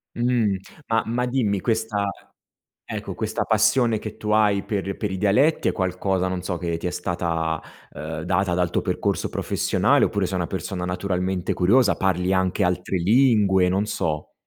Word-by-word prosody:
Mh, 120 -5 +1 0.3
ma 115 0 +3
ma 120 +2 0
dimmi, 120 -6 0
questa 110 -1 -1 0.8
ecco - - -5
questa - - -2
passione 110 +1 +3
che 110 - -7
tu 105 - -4
hai 105 -2 +3
per 100 -3 -3
per 105 -3 -3
i - - -2
dialetti 115 - +2
è - - +1
qualcosa, 95 0 -1
non 90 -1 -3
so, 90 -1 -3
che 85 -1 -2
ti 85 +2 -3
è - - -3
stata, 80 -3 -2 0.3
ehm, 80 +1 -6
data 90 +2 0
dal 90 -1 +1
tuo - - 0
percorso - - -1
professionale - - +1
oppure 100 -2 0
sei 95 +1 -3
una 85 -2 -2
persona 95 -1 -4
naturalmente 90 0 -2
curiosa? 100 +4 +4
Parli 95 -1 0
anche 95 +1 +1
altre 90 +1 -1
lingue, 100 -2 +4
non 95 +3 0
so. 80 -7 -3
95 Hz, 170 wpm, -23 LUFS, 90-110 Hz, 0.8 s, curiosa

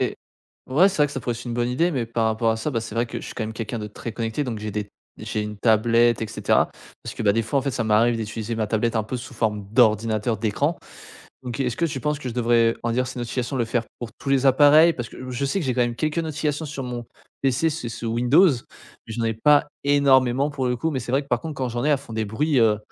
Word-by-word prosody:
Et - - -1 0.5
ouais, 155 +9 +5
c'est 190 - -5
vrai 150 - +5
que 145 - -9
ça 135 - -4
pourrait 120 - -2
être 120 - -9
une 120 -2 -4
bonne 120 0 0
idée, 165 +8 +1
mais 130 -7 -2
par 115 0 0
rapport 110 +1 +1
à 110 - 0
ça, 110 +7 -3
bah, 115 -5 -1
c'est 110 -1 -7
vrai 115 +1 +1
que 120 0 -6
je - - -9
suis - - -8
quand 110 - -3
même 110 - -5
quelqu'un 115 +1 -4
de 105 - -5
très 110 +2 -7
connecté 115 +6 -2
donc 120 -4 -4
j'ai 110 - -4
des 105 0 -4 0.3
j'ai 105 - -3
une 105 0 -6
tablette 115 +2 +3
et - - -1
cetera. 110 - +1 0.3
Parce - - -6
que, - - -5
bah, 100 - +4
des 115 +2 +1
fois, 135 +5 0
en - - -7
fait, 140 - -1
ça 120 -2 -2
m'arrive 110 +2 +3
d'utiliser 110 +1 -4
ma 110 -1 0
tablette 115 +2 0
un 110 - 0
peu 120 +4 -4
sous 120 - -8
forme 105 -3 -1
d'ordinateur, 110 -1 +2
d'écran, 140 +10 0 0.7
donc 125 0 -5
est-ce 125 -3 -1
que 170 - 0
tu 140 -4 -4
penses 150 +1 -1
que 130 - -5
je - - -8
devrais 115 -1 +3
réduire 120 +2 0
ces 130 0 -7
notifications, 120 +2 -3
le 120 - 0
faire 115 0 -1
pour 120 -2 -6
tous 140 - -4
les 135 0 +3
appareils 150 +5 +6
parce 120 -2 -5
que 130 0 -8
je 125 +2 -2
sais 165 +8 0
que 155 - -3
j'ai 125 - 0
quand 125 - +2
même 120 0 -1
quelques 155 +3 -1
notifications 155 -1 -2
sur 140 -2 -5
mon 120 -1 -5 0.4
PC, 135 +4 +2
c'est 145 -6 -5
sous 115 - -6
Windows 125 +11 +5
mais 120 -3 -8
j'en 115 0 -2
ai 115 - 0
pas 145 +6 +4 0.2
énormément 140 -1 +3
pour 135 -3 -2
le 125 - 0
coup 160 +7 -1
mais 135 -4 -2
c'est 120 +1 -5
vrai 140 +2 +2
que, 140 - -18
par 120 -2 +1
contre, 160 - -4
quand 130 -2 -2
j'en 120 +1 -3
ai, 150 - +3
elles 145 - +3
font 135 -5 -10
des 110 0 -1
bruits, 135 +7 0
heu, 110 -2 +4
120 Hz, 285 wpm, -23 LUFS, 115-140 Hz, 0.7 s, appareils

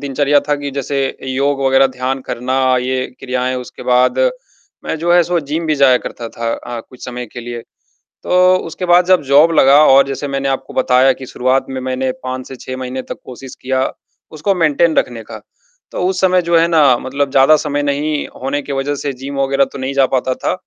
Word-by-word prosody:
दिनचर्या 145 +1 +1
था 145 - +3
कि 145 0 -5
जैसे 140 0 -3 0.3
योग 140 +1 0
वग़ैरह 135 0 +4
ध्यान 130 +1 -2
करना, 130 +1 0
ये 130 +1 -2
क्रियाएँ, 130 -1 -2
उसके 125 - -9
बाद 125 0 +2 0.7
मैं - - -3
जो 170 +2 +1
है 175 - +6
सो 175 0 -1
जिम 155 +3 -4
भी 155 - +1
जाया 135 -3 +4
करता 115 -1 -6
था 115 0 -4
अ, 120 -1 -7
कुछ 125 +2 -14
समय 125 -1 -6
के 120 - -7
लिए, 120 0 -6 0.6
तो 180 0 +4
उसके 180 +3 -5
बाद 175 0 +4
जब 185 0 +4
जॉब 145 +4 +5
लगा 140 +3 +6
और 135 0 +5
जैसे 140 +1 -4
मैंने 135 0 -2
आपको 135 0 -4
बताया 130 +1 +3
कि 130 +1 -10
शुरुआत 130 +1 0
में 130 -1 -5
मैंने 130 0 -2
5 130 0 -5
से 135 - -9
6 130 +1 -7
महीने 130 0 -5
तक - - -8
कोशिश 130 +1 -10
किया, 130 0 -1 0.4
उसको 155 +6 -1
मेंटेन 165 -1 +2
रखने 115 -2 -1
का, - - -10 0.5
तो - - -4
उस 185 -1 -1
समय 185 -1 +3
जो 170 0 +2
है 165 +1 +3
ना 150 -7 +4
मतलब 135 +2 -3
ज़्यादा 135 +3 +5
समय 145 -1 -2
नहीं 145 +1 -1
होने 135 +2 -2
की 140 - -8
वजह 140 +2 -2
से 140 0 -3
जिम 135 +2 -8
वग़ैरह 135 0 +2
तो - - -7
नहीं 130 +1 -3
जा 135 -1 +3
पाता 130 0 +1
था, - - -2
135 Hz, 210 wpm, -16 LUFS, 130-145 Hz, 0.7 s, है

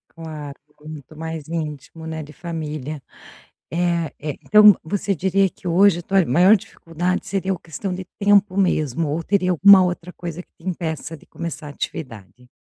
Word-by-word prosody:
Claro, 155 -3 -8 0.2
muito 155 0 -10
mais 160 -1 -6
íntimo, 160 -1 -6
né, 160 -1 -5
de 150 +1 -13
família, 155 -4 -5 0.7
eh 170 -1 0
eh, 150 -1 -5
então 210 -1 +7
você 200 +4 -1
diria 190 +2 +1
que 180 - -11
hoje 180 +1 +4
a - - -6
tua 190 0 +2
maior 180 - +5
dificuldade 175 -1 -3
seria 195 -1 -1
o 175 - -7
questão 180 +3 -5
de 185 0 -6
tempo 200 -1 +3
mesmo, 155 -5 +1
ou 160 +3 -1
teria 185 -1 +1
alguma 190 +2 +7
outra 180 0 -3
coisa 170 0 -6
que - - -23
te 170 - -12
impeça 160 -3 -4
de - - -20
começar 170 -3 -7
atividade? 125 - -7
170 Hz, 165 wpm, -21 LUFS, 155-185 Hz, 0.7 s, então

